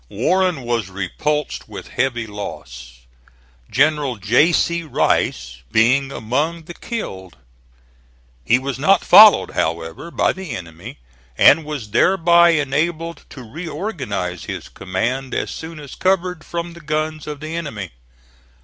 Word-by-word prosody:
Warren 180 - 0
was 120 -4 -2
repulsed 130 - -3
with - - -9
heavy 120 -2 -1
loss, 65 - -9 0.7
General 145 -1 +2
J. 110 - +3
C. 170 0 +1
Rice 105 - 0
being 130 +5 +3
among 150 +9 -2
the 175 - -10
killed. 95 - -7 1.1
He 90 - +4
was 135 0 -4
not 190 +8 +3
followed, 215 -1 +8
however, 80 - -3
by - - +1
the 180 -9 -6
enemy, 85 -4 -9 0.4
and 160 +3 +6
was 140 -9 -6
thereby 170 - +5
enabled 160 +2 -1
to 130 - -10
reorganize 145 - -5
his - - -6
command 120 +8 -3
as - - -2
soon 160 -1 -8
as 145 -3 -10
covered 180 -3 0
from 170 0 -5
the 170 - -13
guns 155 0 -3
of 150 -1 -6
the 155 +2 -6
enemy. 115 - -5
145 Hz, 130 wpm, -20 LUFS, 105-165 Hz, 1.1 s, followed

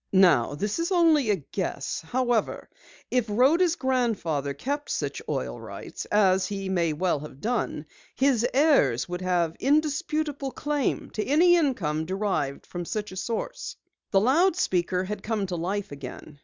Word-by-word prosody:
"Now, 170 -9 +5
this 205 - -2
is 335 +3 -1
only 320 - +4
a 205 - +4
guess. 180 +3 -4
However, 240 +6 -1 0.4
if 250 -3 +2
Rhoda's 315 - +4
grandfather 215 - -1
kept 285 - -3
such - - -2
oil - - -3
rights - - -7
as 190 -2 +3
he 195 -2 -4
may 170 -4 +1
well 160 0 0
have 140 -2 -10
done 220 -8 -2 0.3
his 265 -4 +2
heirs 265 - +3
would 180 +1 -4
have 175 -3 0
indisputable 300 -1 0
claim 295 -2 -1
to 215 - -2
any 340 +6 +5
income 165 - 0
derived 185 -8 -2
from 175 -1 -5
such 210 +2 -4
source." 225 +4 -4 0.3
The 195 - +4
loudspeaker 245 - +2
had 210 +3 -5
come 215 -2 -1
to 185 -2 -4
life 190 +3 -3
again. 145 +1 -9
205 Hz, 145 wpm, -26 LUFS, 175-275 Hz, 0.4 s, Now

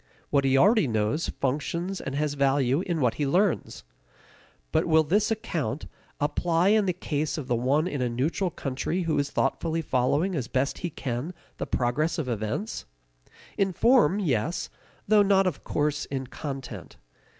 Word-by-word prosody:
What 140 -1 +3
he 135 0 +4
already 205 - +5
knows 110 +8 0
functions 170 +7 -2
and 135 - -4
has 150 0 0
value 140 0 +2
in 170 -4 -1
what 125 -3 +3
he 145 - +1
learns. 180 - 0 0.9
But - - +1
will 160 -1 +5
this 205 +8 +2
account 170 -9 -2 0.3
apply 165 +4 +1
in 210 -1 +3
the - - +3
case 155 -4 -2
of 145 -5 -5
the 120 - +1
one 135 +7 +2
in 145 -7 -3
a 125 - +1
neutral 150 +10 0
country 155 +4 -3
who 160 -3 0
is 140 0 0
thoughtfully 160 +4 -1
following 145 +8 +1
as 135 -8 -2
best 130 +3 -1
he 175 - -3
can 140 +4 -4 0.2
the - - -4
progress 145 +8 0
of 155 -5 -2
events? 120 - -3 0.7
In 195 -1 +2
form, 230 - +4
yes, 160 - -1 0.4
though 210 0 +6
not 195 -1 +4
of 180 -6 -2
course 150 0 -1
in 135 -1 -4
content. 130 - -7
150 Hz, 165 wpm, -27 LUFS, 135-180 Hz, 0.9 s, though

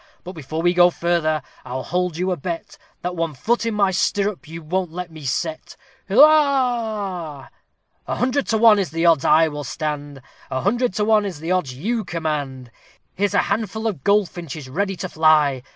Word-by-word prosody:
But, 180 - -7
before 160 0 -5
we 175 0 +3
go 175 0 +6
further, 170 -3 0 0.2
I'll 130 +1 -5
hold 180 -1 -2
you 185 +2 -1
a - - +1
bet, 170 +2 -6 0.2
That 180 0 -3
one 165 -3 -2
foot 230 - 0
in 225 - -1
my 200 -2 +2
stirrup 195 -2 -1
you 165 +1 -8
won't 180 +2 -2
let 180 0 -6
me 155 -3 -11
set. 160 +5 -3 0.3
Hilloah! 225 - +2 0.6
"A - - -2
hundred 255 +4 0
to 225 - +1
one 220 -2 +6
is 190 -5 -1
the 165 +3 -1
odds 165 -5 +4
I 160 +1 +5
will 145 -1 -5
stand, 145 -1 -5 0.3
A 130 -1 -2
hundred 235 +1 0
to 210 - +1
one 215 -1 +4
is 190 -7 -5
the 165 +3 -4
odds 180 -9 0
you 220 - -2
command; 145 - -4 0.4
Here's 200 +1 -1
a - - +4
handful 220 0 -2
of 185 -12 -2
goldfinches 175 -8 -1
ready 195 +8 -2
to 185 - -5
fly! 155 -5 +3
175 Hz, 185 wpm, -21 LUFS, 155-205 Hz, 0.6 s, go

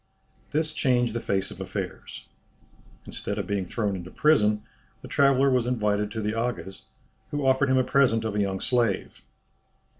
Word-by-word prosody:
This 155 +1 0
changed 125 -6 +1
the 120 - -1
face 95 -4 -1
of - - -9
affairs. - - -6 0.8
Instead 100 - -5
of 100 - -2
being 100 -1 -2
thrown 105 -1 -1
into 90 -1 -7
prison 105 -7 +3 0.4
the - - -8
traveller 140 -1 +3
was 125 -2 +2
invited 105 -4 0
to 110 +1 -4
the 105 0 -1
Aga's, 115 -4 -4 0.4
who 145 -1 -2
offered 130 +1 +3
him 130 - +4
a 130 - +4
present 125 -4 +2
of 110 - -2
a 105 - +1
young 95 -1 -1
slave. 120 -5 0
115 Hz, 170 wpm, -26 LUFS, 105-130 Hz, 0.8 s, him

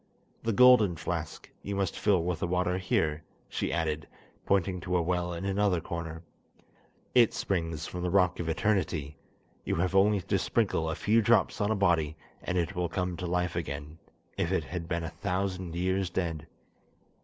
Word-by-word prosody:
The 115 - 0
golden 110 -5 +6
flask 80 -1 -4
you 100 - -4
must 100 -1 -1
fill 95 -5 +3
with 90 -2 -2
the 90 - -1
water 90 +1 0
here," 80 -4 0 0.3
she - - -2
added, 80 -2 -1 0.4
pointing 95 -1 +1
to 90 0 0
a - - +2
well 90 0 -1
in 85 +2 -5
another 100 -2 +2
corner. 80 0 -6 0.9
"It 120 -3 +5
springs 80 -4 -2
from 90 - -5
the 90 - -1
rock 90 -1 +3
of 85 -1 -2
eternity; 80 -5 0 0.5
you - - -1
have 90 +3 0
only 100 +1 +4
to 90 - 0
sprinkle 80 0 0
a 80 - -2
few 110 +5 +3
drops 115 0 +3
on 105 - +1
a 110 - +2
body 85 -6 +2 0.3
and 90 - -2
it 85 -3 -1
will 90 -1 -1
come 90 -2 -2
to 90 - -4
life 90 -1 -1
again, 75 -1 -5 0.4
if - - 0
it - - +1
had 85 -1 -5
been 85 -1 -2
a 80 - -3
thousand 90 +1 -3
years 95 +1 0
dead." 85 -4 -3
90 Hz, 180 wpm, -29 LUFS, 80-95 Hz, 0.9 s, golden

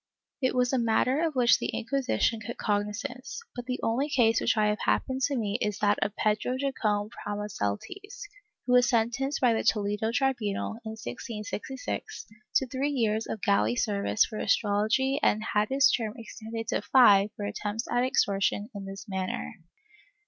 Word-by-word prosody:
It 260 -1 +1
was 250 +1 +2
a 260 - +3
matter 240 +5 +2
of 320 -3 -1
which 245 -2 +5
the - - -2
Inquisition 250 -2 0
took 235 - -6
cognizance, 210 - -3 0.2
but 245 -1 -6
the 250 0 -2
only 260 +6 0
case 230 -5 +3
which - - +1
I 215 - +3
have 210 0 +1
happened 260 0 0
to 280 -2 -2
meet 210 -1 -2
is 210 -1 -1
that 205 0 +2
of 205 +1 -1
Pedro 215 +4 0
Jacome 215 -6 -1
Pramo 205 -3 -5
seltes, 365 - -5 0.4
who 250 - +1
was 250 0 +5
sentenced 245 +4 0
by 245 -3 +4
the 225 - -1
Toledo 210 +1 +1
tribunal, 235 -5 -1
in 220 -1 -5
1666, 240 - -6 0.3
to 265 - +4
three 265 +3 -2
years 225 -5 0
of 215 - -5
galley 200 +4 +2
service 210 -2 +1
for 215 - -7
astrology 220 +6 +1
and 215 +1 +2
had 210 0 +2
his 275 +2 +4
term 220 -3 -1
extended 225 0 -7
to - - 0
five 205 -6 +6
for 205 - -5
attempts 210 +2 -3
at 245 0 +2
extortion 205 -2 +1
in 200 -1 -7
this 195 +1 -8
manner. 185 - -3
225 Hz, 170 wpm, -28 LUFS, 210-255 Hz, 0.4 s, five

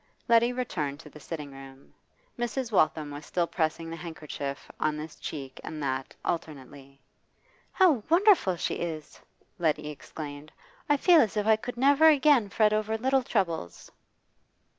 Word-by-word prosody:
Letty 235 +1 +4
returned 160 - -3
to 150 - -14
the 150 - -13
sitting 150 -1 -7
room; 135 0 -13 0.4
Mrs. 240 0 -3
Waltham 155 -5 +2
was 145 +1 -8
still 175 +2 -1
pressing 165 -1 -2
the - - -4
handkerchief 155 -4 -7
on 155 0 0
this 155 +1 -7
cheek 135 -3 -7
and 155 - -6
that 130 -1 -3
alternately. 140 -4 -5 0.7
'How 340 - +4
wonderful 345 - +4
she - - -2
is!' 160 -3 -6 0.4
Letty 155 -2 0
exclaimed. 145 +1 -9 0.4
'I 290 - +4
feel 340 +2 +6
as 215 -1 0
if 210 - 0
I 220 0 +5
could 245 +3 -7
never 285 +5 +5
again 285 -7 +5
fret 215 +1 +3
over 215 +1 0
little 265 +3 +2
troubles. 175 - -3
170 Hz, 150 wpm, -28 LUFS, 150-240 Hz, 0.7 s, feel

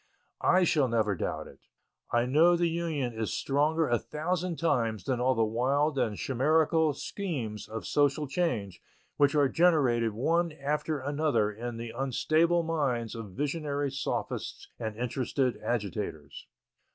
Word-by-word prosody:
I 185 0 +4
shall 150 -5 +3
never 110 -3 +1
doubt 90 - -3
it. - - -14 0.5
I 120 0 +2
know 155 +7 +5
that 175 - 0
the - - +4
Union 160 -7 -2
is 110 -2 -3
stronger 150 +3 +1
a 120 -1 +2
thousand 175 +2 -2
times 115 - 0
than 125 +4 -1
all 130 +1 +3
the 115 - +2
wild 135 +6 +1
and 105 -5 0
chimerical 155 +3 +2
schemes 135 - -4
of 110 +1 -6
social 145 +1 +1
change 120 - -2 0.4
which 145 +1 +3
are 145 -2 +4
generated 130 -9 +3
one 165 +8 +1
after 150 +1 -2
another 140 -6 +1
in 115 +2 -6
the 115 0 -6
unstable 155 +6 +2
minds 135 -8 -1
of 110 -5 -8
visionary 145 - -2
sophists 140 +1 -4
and 110 -2 -4
interested 125 +2 -1
agitators. 100 -10 -4
135 Hz, 145 wpm, -29 LUFS, 115-155 Hz, 0.5 s, know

